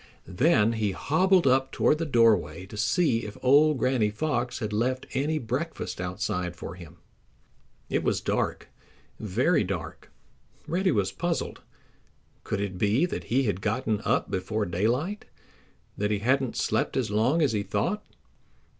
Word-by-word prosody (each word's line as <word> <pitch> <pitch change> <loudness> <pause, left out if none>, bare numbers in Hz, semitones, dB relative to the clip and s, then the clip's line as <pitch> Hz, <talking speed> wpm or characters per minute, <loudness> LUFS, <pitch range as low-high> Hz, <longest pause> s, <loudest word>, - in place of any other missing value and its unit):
Then 115 - +3
he 105 -3 -1
hobbled 180 - +2
up 130 0 +3
toward 150 - +2
the 165 - -2
doorway 105 - +3
to 100 - -11
see 115 +4 +2
if 105 -2 -7
old 145 +3 +5
Granny 125 -4 +1
Fox 125 +1 -2
had 110 -3 -4
left 130 +4 0
any 145 +4 0
breakfast 130 - -4
outside 90 -1 -3
for 85 - -7
him. 85 -2 -12 0.9
It - - 0
was - - +1
dark, - - -2 0.5
very 115 - +1
dark. 90 -3 -6 0.5
Reddy 185 +3 +1
was 95 -3 +1
puzzled. 170 - -3 0.8
Could 100 - -2
it 95 -3 -4
be 110 - +3
that 180 - -5
he 130 +3 +1
had 100 -5 -1
gotten 110 0 -1
up - - 0
before 105 +3 -1
daylight—that 110 - -4
he 105 - +1
hadn't 130 +4 0
slept - - 0
as - - -1
long 125 +10 +2
as 140 - +2
he 105 -2 0
thought? 205 - -1
115 Hz, 145 wpm, -27 LUFS, 100-145 Hz, 0.9 s, old